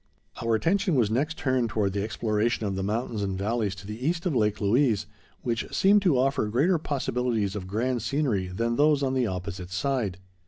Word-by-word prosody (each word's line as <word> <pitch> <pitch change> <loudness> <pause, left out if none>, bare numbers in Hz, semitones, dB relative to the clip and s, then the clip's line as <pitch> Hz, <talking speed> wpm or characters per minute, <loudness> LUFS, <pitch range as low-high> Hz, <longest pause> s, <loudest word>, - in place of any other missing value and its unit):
Our 115 -1 +2
attention 175 - +1
was 115 -5 +2
next 150 +8 0
turned 130 -3 +1
toward 105 -4 0
the 100 - -1
exploration 110 +1 0
of 100 -1 -1
the 95 - -2
mountains 110 +2 -2
and 95 -2 -2
valleys 105 -1 -1
to 95 +1 -11
the 105 +4 -7
east 165 +4 0
of 170 -6 0
Lake 105 -3 +1
Louise, 110 0 +2 0.4
which 115 -2 -2
seemed 200 +2 +4
to 175 -9 +3
offer 135 -3 +1
greater 150 - +2
possibilities 125 -8 -1
of 95 -3 -5
grand 120 +5 -1
scenery 120 -7 0
than 115 +6 -1
those 145 -1 +4
on 130 -1 0
the 130 -3 +1
opposite 90 -1 -5
side. 105 -1 -1
115 Hz, 195 wpm, -27 LUFS, 100-135 Hz, 0.4 s, seemed